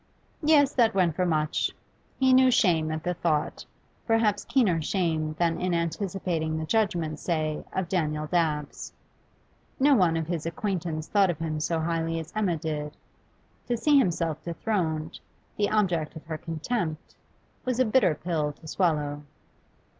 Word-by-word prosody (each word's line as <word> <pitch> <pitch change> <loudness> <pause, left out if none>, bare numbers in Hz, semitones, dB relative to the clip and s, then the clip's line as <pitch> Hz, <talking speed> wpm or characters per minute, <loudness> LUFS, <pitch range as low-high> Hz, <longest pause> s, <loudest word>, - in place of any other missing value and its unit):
Yes, 295 -3 +4
that 230 -4 +3
went 175 -5 +2
for 180 0 +1
much; 155 -2 0 0.4
he 260 -1 +4
knew 260 0 +6
shame 165 -10 +3
at 155 0 -4
the 180 - 0
thought, 160 -3 -1 0.4
perhaps 225 -2 +2
keener 195 -12 +2
shame 160 -3 -1
than 170 -1 +1
in 180 -1 0
anticipating 170 -2 -2
the 160 - -3
judgment, 170 -7 0
say, 155 -3 -1
of 190 -2 -2
Daniel 155 -4 -1
Dabbs. 150 -3 -1 0.9
No 285 +2 +5
one 180 -9 +3
of 165 - -2
his 165 -1 -3
acquaintances 165 -3 -3
thought 200 -3 +3
of 170 - -1
him 155 -1 -3
so 165 +2 0
highly 165 0 -1
as 160 +1 -8
Emma 195 -6 +1
did; 150 -1 -4 0.7
to 240 -1 0
see 290 +4 +4
himself 165 - 0
dethroned, 165 -3 -2 0.4
the 205 -1 +1
object 175 -8 0
of 160 - -10
her 160 -1 -4
contempt, 165 0 -3 0.5
was 255 -1 -1
a 255 - +4
bitter 215 -8 +3
pill 155 -2 -2
to 155 - -19
swallow. 150 -4 0
170 Hz, 155 wpm, -27 LUFS, 155-200 Hz, 0.9 s, knew